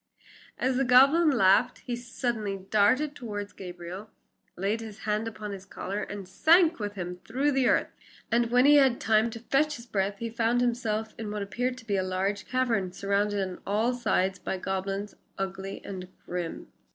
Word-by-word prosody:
ho!" - - -2
As 260 -1 +2
the 270 - +2
goblin 275 +6 +6
laughed 235 -2 +3
he 245 - -2
suddenly 235 -4 -3
darted 255 +8 +3
toward 205 -5 -6
Gabriel, 180 +3 -8 0.5
laid 200 +5 -1
his 215 -2 -9
hand 215 +1 -1
upon 210 -2 -6
his 195 -1 -7
collar, 195 +1 -5
and 200 -3 -6
sank 330 - +4
with 205 -1 -4
him 180 -2 -5
through 260 +10 -1
the 265 -2 +2
earth. - - +2 0.4
And 235 0 +2
when 250 +2 +4
he 295 +1 +7
had 270 -3 +5
had - - -11
time 220 +1 +3
to 230 0 -8
fetch 295 +5 +1
his 235 - -10
breath 200 -3 -1
he 230 +2 -4
found 235 +1 +1
himself 225 -3 -1
in 220 -2 -4
what 210 -1 -3
appeared 250 +5 -2
to 255 - -12
be 200 -3 0
a - - +2
large 190 +2 -2
cavern, 235 -8 0
surrounded 200 +1 0
on 180 - -9
all 220 +5 +1
sides 195 -6 0
by 190 - -3
goblins 195 +2 -3 0.2
ugly 195 0 -5
and 185 -2 -6 0.2
grim. 175 -2 -5
215 Hz, 190 wpm, -28 LUFS, 195-245 Hz, 0.5 s, he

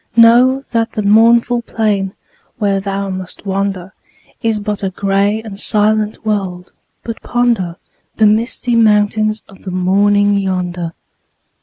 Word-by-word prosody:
Know 245 +4 +5
that 230 -1 -1
the 215 - -2
mournful 235 +3 +4
plain 205 -4 -1 0.4
where 200 -3 0
thou 195 0 -3
must 185 +1 -8
wander 195 -1 -3 0.5
Is 225 -2 0
but 210 0 -3
a 195 - -1
gray 200 +3 0
and 205 -3 -9
silent 215 +1 0
world, 190 -4 -3 0.3
but 230 -1 -6
ponder 235 -8 0 0.4
The 220 - +3
misty 230 +3 +1
mountains 215 -1 +2
of 195 - -17
the 195 - -7
morning 200 +2 +2
yonder. 180 -3 -3
205 Hz, 130 wpm, -15 LUFS, 195-220 Hz, 0.5 s, Know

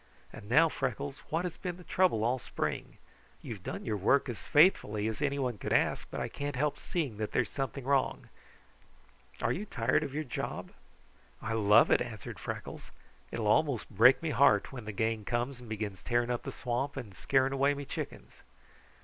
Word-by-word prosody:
And 100 - -10
now, 155 +7 +6
Freckles, 135 -1 -3
what 165 +3 0
has 175 - -4
been 180 -1 -4
the 180 - -12
trouble 175 -12 +2
all 125 +3 +1
spring? - - -4 0.5
You - - -5
have - - -11
done - - -6
your 105 - -1
work 125 +8 +3
as 110 -4 -5
faithfully 130 - +4
as 110 +4 -4
anyone 135 -6 -1
could - - -4
ask, - - +2
but - - -5
I - - -1
can't 145 -1 -4
help 145 +3 0
seeing 145 - -3
that 110 0 -3
there 125 - +3
is 110 - -11
something 135 0 -3
wrong. 135 0 +1 1.2
Are - - +2
you 195 - -2
tired 125 +2 +1
of 145 -3 -5
your 155 - -1
job?" 125 - -5 0.7
"I 115 - -3
love 105 0 +5
it," - - +5
answered 115 -4 -6
Freckles. - - -6 0.4
"It - - -5
will 115 - -2
almost 125 +3 +2
break 125 +8 +6
me 160 - 0
heart 135 -8 +4
when 125 -5 -8
the 110 - -4
gang 110 +1 -1
comes 120 +4 -2
and 120 -2 -12
begins 105 -3 -4
tearing 120 0 0
up 120 - -1
the - - -6
swamp 130 +3 -2
and 115 -7 -6
scaring 135 +6 +2
away 140 +1 +2
me 140 0 -6
chickens." - - -7
125 Hz, 200 wpm, -31 LUFS, 110-140 Hz, 1.2 s, now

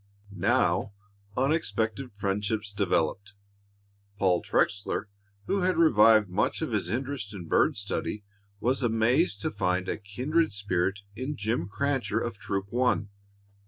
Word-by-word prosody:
Now 100 +2 +1 0.4
unexpected 125 -4 0
friendships 105 +1 -1
developed. 100 +1 0 0.8
Paul 90 -3 +2
Trexler, 100 +1 0 0.4
who 200 - 0
had 180 -1 +1
revived 110 -9 +6
much 90 - 0
of - - -3
his - - 0
interest 125 -4 -3
in 90 -3 -7
bird - - +3
study, 100 +1 -3 0.4
was 130 +6 0
amazed 115 - +2
to - - -1
find 90 -2 0
a - - -2
kindred 130 +10 0
spirit 100 -1 -1
in 130 +6 -4
Jim 110 -3 -1
Crancher 135 -2 0
of 115 -4 -4
Troop 100 +1 -3
One. 120 -4 +1
105 Hz, 125 wpm, -28 LUFS, 100-125 Hz, 0.8 s, revived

